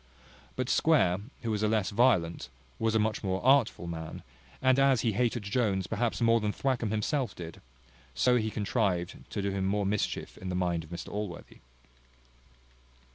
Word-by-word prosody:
But 130 -1 -2
Square, 130 - +3 0.2
who 115 - -1
was 105 -1 -1
a 110 - +2
less 110 -2 +1
violent, 100 - +2 0.3
was 110 0 +1
a - - +6
much 110 0 0
more 95 -1 0
artful 130 -9 +4
man; 80 -2 -6 0.4
and 130 0 +3
as 135 -4 +4
he 115 - +1
hated 120 +1 0
Jones 100 -4 0
more - - 0
perhaps 120 -2 0
than 115 -3 +3
Thwackum 125 -5 -1
himself 120 +5 -1
did, 85 -2 -9 0.5
so 125 -1 +3
he 110 -2 0
contrived 100 -4 -1
to 100 - -3
do 100 - 0
him 95 -1 -1
more 100 +1 0
mischief 100 +1 -2
in 95 - -5
the 90 - -2
mind 90 -2 0
of 80 - -14
Mr 85 - -7
Allworthy. 105 -4 -6
105 Hz, 175 wpm, -29 LUFS, 95-120 Hz, 0.5 s, a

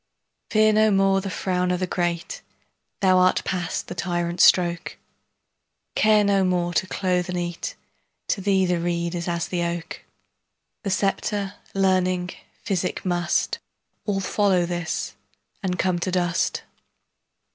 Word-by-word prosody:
Fear 215 0 +4
no 215 0 +4
more 195 -1 +3
the 195 - -4
frown 180 -1 -1
o' 180 - +1
the 185 - -1
great, 175 -1 -2 0.6
Thou 185 -1 +5
art 185 0 +3
past 180 -3 -2
the - - -6
tyrant's 175 -1 0
stroke; 175 -1 +3 1.0
Care 215 -1 +4
no 200 -1 +3
more 175 -1 0
to 185 - +1
clothe 180 -1 0
and 180 - -2
eat; 175 -1 -4 0.5
To 195 - 0
thee 190 -1 +3
the 180 -1 +1
reed 170 0 -1
is 175 0 -3
as 170 -1 -1
the 175 -1 -2
oak:The 170 +4 -8
sceptre, 195 +1 0 0.2
learning, 185 -2 +2 0.3
physic, 185 -2 -2
mustAll 185 +2 -2
follow 190 -3 +2
this, 175 -2 -3 0.5
and 185 -3 -1
come 185 -2 +1
to 180 - -1
dust. 175 -2 0
180 Hz, 135 wpm, -24 LUFS, 175-195 Hz, 1.0 s, Thou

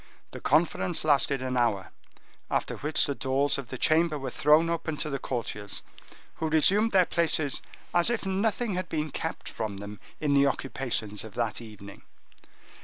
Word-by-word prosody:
The - - -8
conference 170 +1 +2
lasted 140 -2 +3
an 130 0 -2
hour; 115 -6 0 0.6
after - - -1
which 150 +2 +2
the 140 - -1
doors 135 +1 0
of 135 - -7
the 130 - -6
chamber 160 +3 +2
were 135 -2 -5
thrown 150 +5 +4
open 165 -2 -2
to 150 +1 -3
the 140 - -2
courtiers, 105 -6 -4 0.5
who 160 - -1
resumed 195 +8 +4
their 185 -2 +5
places 160 -5 +1 0.3
as 175 +3 +5
if 240 -3 -1
nothing 205 +3 0
had 180 -1 -3
been 155 -2 -2
kept - - -5
from 105 -3 -4
them 100 0 -8 0.2
in 150 -2 +1
the 140 0 +5
occupations 120 -6 -2
of 110 -2 -11
that 115 -2 -2
evening. 105 -3 -11
140 Hz, 170 wpm, -28 LUFS, 120-165 Hz, 0.6 s, their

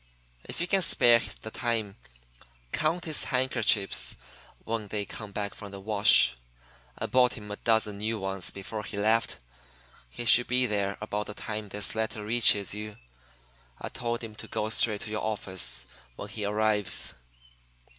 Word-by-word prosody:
"'If - - -6
you 175 - +1
can 195 +1 +3
spare 120 -8 +5 0.2
the 110 - -6
time, 110 -5 -1 0.8
count 160 +3 0
his 155 -3 0
handkerchiefs 125 -6 +1 0.5
when 110 -2 -3
they 100 0 -3
come 105 -1 -8
back 100 0 -3
from 100 - -9
the 100 0 -9
wash. 100 - +4 0.6
I - - -3
bought 125 -1 +3
him 105 -3 -9
a - - -2
dozen 110 -2 +1
new 110 +2 -1
ones 95 -2 0
before 100 +3 -6
he 105 - -7
left. 110 +3 +1 0.7
He 120 - -6
should 120 +1 +6
be 125 +1 +2
there 100 -3 -1
about 105 0 -3
the 105 - -6
time 105 -1 -5
this 105 +1 0
letter 110 -1 -3
reaches 105 -3 +5
you. 105 0 -6 0.8
I - - -5
told 120 0 -4
him 110 -1 -7
to - - -6
go 110 -1 -2
straight 110 -1 +2
to 105 - -6
your 105 - -3
office 95 - -2 0.3
when - - -8
he 105 -2 -4
arrives.'" 105 -1 +1
105 Hz, 165 wpm, -28 LUFS, 100-115 Hz, 0.8 s, should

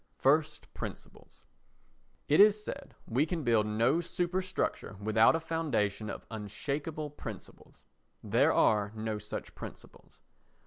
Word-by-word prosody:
First 150 +2 +1
Principles - - -9 0.8
It 150 - +4
is 210 +1 +7
said 280 +4 -7
we 135 +7 +1
can 165 -1 -2
build 115 -4 +3
no 115 +10 +2
superstructure 180 - -2
without 110 +6 +4
a - - +1
foundation 125 -11 -1
of - - -6
unshakable 145 +8 -4
principles. 110 -9 -10 0.4
There - - +3
are 105 -1 +3
no 110 -1 -3
such 105 - -6
principles. - - -12
140 Hz, 120 wpm, -31 LUFS, 110-165 Hz, 0.8 s, is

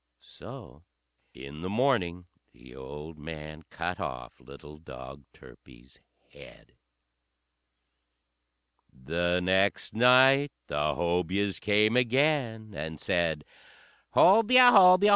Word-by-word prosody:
So 75 - -14 0.5
in 70 +3 -11
the 90 - -6
morning 100 -7 -1 0.3
the 60 +1 -17
old 75 +4 -11
man 75 0 -10
cut - - -6
off - - -7
little 75 +2 -14
dog 70 -3 -12
Turpie's 65 0 -20 0.3
head. - - -17 2.3
The 85 +4 -1
next 95 +2 0
night 130 +4 +4 0.2
the 75 0 -2
Hobyahs 90 +3 -2
came 105 +2 +1
again, 125 -4 -1
and 80 +1 -7
said, 85 -5 -2 0.7
"Hobyah! 245 +5 +5
Hobyah! 185 0 +6
90 Hz, 95 wpm, -27 LUFS, 75-125 Hz, 2.3 s, Hobyah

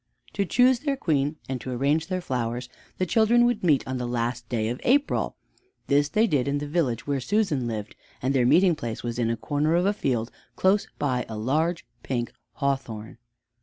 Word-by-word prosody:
To 200 - 0
choose 250 +5 +4
their 280 0 -1
Queen 150 - 0
and 130 -2 -3
to - - -6
arrange 140 +6 +1
their 185 0 -2
flowers 125 -5 -2 0.3
the 185 - +1
children 230 +5 +4
would 240 -4 0
meet 150 -6 +3
on 130 0 -2
the 125 - -2
last 120 0 -2
day 110 -3 0
of 120 - -4
April. 285 +4 +2 0.5
This 145 +1 +2
they 215 +8 +3
did 145 - +1
in 140 +1 +1
the 145 - -3
village 145 -7 0
where 140 -1 0
Susan 155 - 0
lived, 110 -2 -5 0.2
and 130 +2 0
their 125 -3 +3
meeting 180 +4 +5
place 115 -6 -5
was 120 0 -3
in 115 -1 +1
a 115 - -1
corner 145 +8 0
of 175 +2 +2
a 200 - +3
field 120 - -1 0.2
close 195 +2 +2
by 125 -3 -1
a 110 - -5
large 155 +9 0 0.2
pink 120 -2 -3 0.2
hawthorn. 120 -6 -3
140 Hz, 200 wpm, -26 LUFS, 120-180 Hz, 0.5 s, meeting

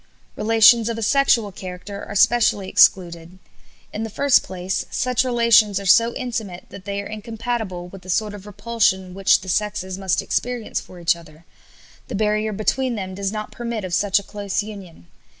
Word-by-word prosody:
Relations 225 +1 +5
of 230 - -3
a 225 - -3
sexual 235 -4 +2
character 185 +2 -8
are 200 - -8
specially 210 -2 +3
excluded. 170 -2 +2 0.6
In 210 - -4
the 225 - -3
first 280 +5 +3
place, 185 +1 -4
such 250 0 0
relations 235 -5 +4
are 200 - -8
so 230 +5 +4
intimate 225 -8 -5
that 195 - -12
they 200 0 -3
are - - -11
incompatible 215 -4 -5
with 190 +1 -12
the 185 - -13
sort 210 +3 0
of 205 0 -10
repulsion 200 -4 0
which 195 +1 +3
the - - -11
sexes 190 -1 -2
must 190 -2 0
experience 245 -3 -2
for 180 - -14
each 170 0 +2
other; 165 -1 -16 0.6
the - - -5
barrier 215 +1 0
between 235 +4 -1
them 190 -3 -5
does 195 0 -3
not 215 -1 -5
permit 235 -3 -5
of 180 - -6
such 195 +1 +2
a 200 - -2
close 205 0 -3
union. 195 - -11
205 Hz, 180 wpm, -21 LUFS, 185-225 Hz, 0.6 s, Relations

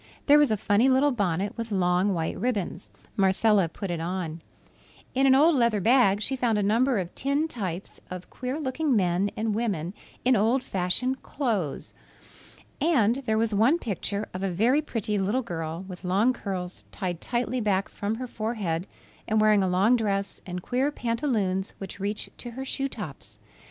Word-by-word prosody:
There 295 0 +7
was 295 - +4
a 215 - +1
funny 205 +6 +3
little 270 +2 +4
bonnet 200 -4 -1
with 230 -1 -5
long 180 0 +2
white 160 -1 -2
ribbons. 205 -7 -2 0.3
Marcella 195 -1 +3
put 190 +3 -5
it 170 - -2
on. 170 -2 -3 0.7
In 270 +1 +3
an 265 - +6
old 315 +5 +6
leather 235 -4 +3
bag 215 -2 +4
she 265 - +1
found 240 -4 +1
a 205 - +1
number 235 +5 +2
of 180 -3 -3
tin 280 +4 0
types 195 - -5
of 180 0 -8
queer 255 +4 -4
looking 290 0 0
men 185 0 +2
and 220 0 0
women 200 -6 -2 0.3
in 255 0 +5
old 235 +5 +2
fashioned 195 +8 0
clothes. 215 - -2 0.9
And 255 -8 +3
there 220 0 +2
was 225 -1 +1
one 230 +11 +4
picture 205 - -3
of 185 - -5
a 195 - 0
very 230 - +3
pretty 215 -7 -2
little 210 +7 0
girl 165 -2 -5
with 180 -1 -9
long 200 +8 +2
curls 185 -5 -5
tied 175 -3 -4
tightly 245 +1 -1
back 200 -2 +1
from 205 +1 -3
her 255 +3 -5
forehead 210 -7 -3 0.4
and 220 -1 +2
wearing 215 -1 +5
a 190 - +1
long 195 +7 +4
dress 200 -4 -1
and 180 -1 -5
queer 265 +4 0
pantaloons 230 -8 -1
which 195 0 -8
reached 205 +2 -4
to 240 - -5
her 265 +3 -6
shoe 275 +1 -2
tops. 140 - -9
210 Hz, 175 wpm, -26 LUFS, 185-250 Hz, 0.9 s, There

